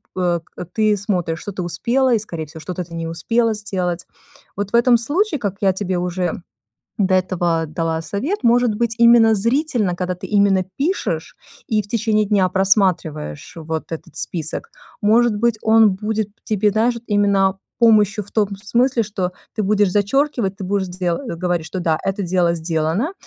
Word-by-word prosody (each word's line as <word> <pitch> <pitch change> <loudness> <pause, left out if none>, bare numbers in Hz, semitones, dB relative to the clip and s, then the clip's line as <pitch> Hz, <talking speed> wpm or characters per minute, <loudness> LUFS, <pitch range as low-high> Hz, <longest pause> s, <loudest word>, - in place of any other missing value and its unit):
э, 175 -2 +1 0.2
э, 180 - -5
ты 215 -1 +2
смотришь, 180 -5 -2
что 205 - -6
ты 185 -2 -4
успела 240 +10 +1
и 225 - +3
скорее 170 -6 -6
всего, 160 +2 -11
что-то 180 +3 -4
ты 170 - -14
не 165 0 -4
успела 225 +8 0
сделать. 180 -4 -3 0.5
Вот, 205 0 -3
в - - 0
этом 240 0 +5
случае, 305 - 0
как 200 -4 -2
я 195 -2 +3
тебе 190 -1 -2
уже 180 0 -2 0.6
до 190 -2 +2
этого 175 -3 0
дала 160 +1 -2
совет, 230 - -3
может 240 -2 +3
быть, 230 +1 -1
именно 235 -1 +6
зрительно, 230 - 0
когда 180 0 -2
ты 180 - -8
именно 200 -2 +3
пишешь 345 +8 -2 0.3
и 215 -1 +1
в 205 - -15
течение 215 -1 +1
дня 200 -2 +2
просматриваешь 180 - 0
вот 160 0 -5
этот 165 - -7
список, 175 - -4 0.3
может 225 +2 +4
быть, 230 +1 +1
он 220 -1 +5
будет 210 +2 -2 0.2
тебе 210 -1 +1
даже 235 +3 +1
именно 200 -2 +2 0.2
помощью 215 -3 +4
в 200 - -19
том 210 -2 +2 0.2
смысле, 240 +3 +2
что 190 -3 -3 0.2
ты 215 - -2
будешь 205 -1 +2
зачеркивать, 210 0 +1
ты 195 - -7
будешь 190 0 -1
де 180 -1 -2
говорить, 175 - -2
что: 180 +3 -5
да, 160 -3 +1
это 195 +1 -1
дело 175 -1 +2
сделано, 165 - -1
200 Hz, 175 wpm, -20 LUFS, 180-225 Hz, 0.6 s, именно